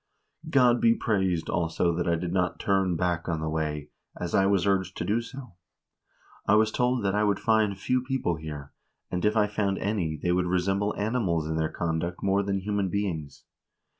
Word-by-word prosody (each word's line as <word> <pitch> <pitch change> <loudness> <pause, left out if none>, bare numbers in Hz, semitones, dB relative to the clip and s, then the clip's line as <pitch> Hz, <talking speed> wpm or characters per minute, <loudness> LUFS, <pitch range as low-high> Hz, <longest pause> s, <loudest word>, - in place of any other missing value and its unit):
God 125 -5 +4
be 115 0 +5
praised, 95 -6 0
also, 85 0 0
that 85 +1 -1
I 85 - +3
did 85 +1 -3
not 90 -1 0
turn 95 -3 +1
back 85 0 -1
on 80 -2 -1
the 80 - -3
way, 75 -2 -3 0.3
as 85 - -4
I 95 - +4
was 100 -2 +2
urged 95 -2 0
to - - -2
do. 110 +3 +1 1.3
I 105 - +5
was 110 0 +4
told 125 -2 +1
that 95 - +1
I 105 +1 +2
would 105 -1 +1
find 110 -3 +2
few 125 +6 0
people 130 - -1
here, 75 -3 -8 0.4
and 90 -1 -2
if 105 +1 +2
I 105 - +5
found 100 -1 -1
any, 95 -7 -1
they 90 - -1
would 90 0 +1
resemble 95 +3 0
animals 100 -8 0
in 80 - -2
their 80 -1 0
conduct 85 +1 -3
more 100 0 +2
than 100 -1 -1
human 100 -1 -1
beings. 85 -8 -3
95 Hz, 195 wpm, -27 LUFS, 85-105 Hz, 1.3 s, be